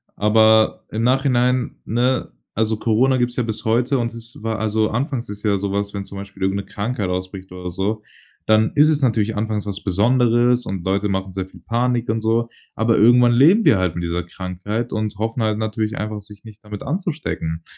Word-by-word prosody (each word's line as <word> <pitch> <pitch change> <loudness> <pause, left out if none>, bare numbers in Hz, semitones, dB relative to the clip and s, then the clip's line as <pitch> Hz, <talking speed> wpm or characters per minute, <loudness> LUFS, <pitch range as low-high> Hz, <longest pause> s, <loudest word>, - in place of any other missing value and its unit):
Aber, 110 +1 +4
im 110 +1 -2
Nachhinein, 125 -1 +1
ne 125 +4 0 0.2
Also, 110 0 0
Corona 120 +5 +2
gibt's 120 0 -1
ja 125 - +1
bis 110 -1 -4
heute 120 +5 +2
und 120 -1 -1
es 115 0 -8
wa 115 0 -1
also, 110 0 0
anfangs 125 0 -2
ist 105 0 -7
ja 105 -2 +2
so 100 0 -3
was, 100 0 -2
wenn 100 -1 -4
zum 100 - -9
Beispiel 100 -1 -8
irgend 95 +1 +1
'ne 100 - -4
Krankheit 105 +1 -3
ausbricht 95 +1 -5
oder 90 0 -6
so, 105 +4 -2 0.4
dann 110 0 +3
ist 150 +1 +6
es 150 -2 +1
natürlich 110 -4 +1
anfangs 105 -1 -2
was 100 -1 -5
Besonderes 120 +4 +3
und 95 -3 -4
Leute 100 +2 +1
machen 95 -1 -2
sehr 95 0 -4
viel 90 -2 -16
Panik 120 +4 -1
und 110 +1 +1
so. 115 +1 0 0.3
Aber 110 0 +2
irgendwann 120 +2 +6
leben 165 - +5
wir 105 - +6
halt 90 -3 0
mit 85 - -3
dieser 85 +1 -2
Krankheit 95 +6 -5
und 110 -1 -2
hoffen 115 +2 -2
halt 110 -1 0
natürlich 110 0 -2
einfach 105 0 -4
sich 100 0 -15
nicht 110 -1 -13
damit 105 -1 -7
anzustecken. 145 - -3
110 Hz, 205 wpm, -20 LUFS, 100-120 Hz, 0.4 s, ist